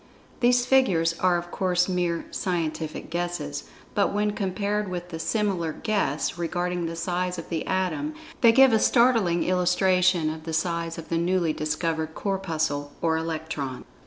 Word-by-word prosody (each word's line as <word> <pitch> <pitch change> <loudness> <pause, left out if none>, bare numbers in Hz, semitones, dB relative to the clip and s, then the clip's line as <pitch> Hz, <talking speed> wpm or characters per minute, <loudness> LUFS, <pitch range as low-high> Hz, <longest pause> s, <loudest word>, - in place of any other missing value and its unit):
These 245 0 +4
figures 190 -11 +3
are 180 -1 +3
of 175 0 -6
course 180 -1 +1
mere 175 -2 -1
"scientific 160 -4 -3
guesses" 170 -4 -3 0.3
but 200 - +2
when 210 +1 +1
compared 205 0 -2
with 175 -1 -5
the 165 -2 -6
similar 185 -4 0
"guess" 185 -7 -1
regarding 175 0 -1
the 165 - -5
size 180 +1 -2
of 165 - -7
the 165 -2 -3
Atom, 190 - -1 0.3
they 230 - +8
give 265 +1 +6
a 220 - +5
startling 230 -9 +3
illustration 180 -2 +2
of 155 0 -8
the 160 0 -5
size 170 0 -1
of 165 - -8
the 165 - +1
newly 170 -2 +1
discovered 160 +1 -2
Corpuscle 160 -7 -2
or 165 -1 +1
Electron. 160 -5 -4
175 Hz, 155 wpm, -26 LUFS, 165-190 Hz, 0.3 s, they